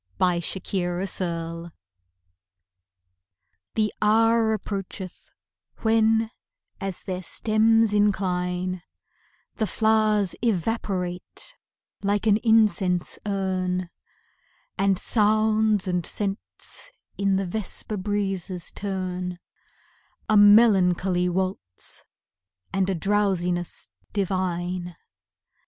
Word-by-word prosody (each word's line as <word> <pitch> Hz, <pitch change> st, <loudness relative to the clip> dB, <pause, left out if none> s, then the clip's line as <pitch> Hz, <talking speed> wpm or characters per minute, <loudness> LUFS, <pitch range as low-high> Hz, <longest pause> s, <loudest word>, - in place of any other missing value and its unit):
Evening 180 Hz, -2 st, +2 dB, 0.3 s
Harmony 175 Hz, -2 st, -2 dB, 2.0 s
The 215 Hz, -1 st, +1 dB
hour 225 Hz, +1 st, +4 dB
approacheth, 195 Hz, -3 st, -5 dB, 0.5 s
when, 225 Hz, 0 st, +3 dB, 0.5 s
as 195 Hz, -2 st, -4 dB
their 185 Hz, -1 st, -4 dB
stems 220 Hz, +3 st, +2 dB
incline, 185 Hz, -3 st, 0 dB, 0.8 s
The 220 Hz, -, 0 dB
flowers 215 Hz, -2 st, +2 dB
evaporate 195 Hz, -, -2 dB, 0.5 s
like 205 Hz, +1 st, 0 dB
an 210 Hz, -1 st, +5 dB
incense 215 Hz, -6 st, +2 dB
urn, 185 Hz, -2 st, -1 dB, 0.8 s
And 195 Hz, -1 st, +2 dB
sounds 215 Hz, -1 st, +2 dB
and 180 Hz, -1 st, 0 dB
scents 200 Hz, -, -4 dB, 0.3 s
in 195 Hz, -1 st, +2 dB
the 195 Hz, 0 st, 0 dB
vesper 210 Hz, +2 st, -2 dB
breezes 195 Hz, -3 st, -2 dB
turn; 185 Hz, -2 st, -4 dB, 0.9 s
A 215 Hz, -, +3 dB
melancholy 195 Hz, -4 st, +5 dB
waltz 180 Hz, -, -3 dB, 0.7 s
and 195 Hz, 0 st, +1 dB
a 190 Hz, -, 0 dB
drowsiness 180 Hz, -2 st, 0 dB, 0.3 s
divine. 180 Hz, -2 st, -2 dB
195 Hz, 75 wpm, -25 LUFS, 180-215 Hz, 2.0 s, an